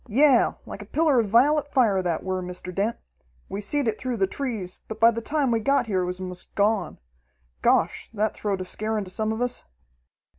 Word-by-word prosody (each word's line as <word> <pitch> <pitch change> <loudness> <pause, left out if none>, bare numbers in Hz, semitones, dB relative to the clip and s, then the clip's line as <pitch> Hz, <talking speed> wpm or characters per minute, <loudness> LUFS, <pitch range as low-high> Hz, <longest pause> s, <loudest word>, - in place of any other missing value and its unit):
"Yeah, 260 +2 +4
like 200 - -8
a - - -8
pillar 300 0 +3
of 225 - +1
vi'let 285 +7 +4
fire 220 -8 +3
that 175 -3 -2
were, 185 0 -2
Mr. 180 0 -7
Dent. 205 +5 -1 0.5
We 200 - -4
seed 275 +6 -1
it 220 -1 -1
through 255 -2 -2
the 195 - +3
trees, 210 -5 -5
but 220 0 -7
by 230 +1 +7
the 230 0 -4
time 280 +1 0
we 230 - +2
got 275 +4 +2
here 195 -4 0
it 180 - -1
was 180 0 -4
'most 180 -1 -8
gone. 205 -3 +1 0.6
Gosh, - - +2
that 215 -1 0
throwed 200 -3 -2
a - - -4
scare 215 +4 -3
into 195 -3 -4
some 220 +3 -1
of 220 +2 -3
us!" 245 0 -2
220 Hz, 215 wpm, -25 LUFS, 190-245 Hz, 0.6 s, by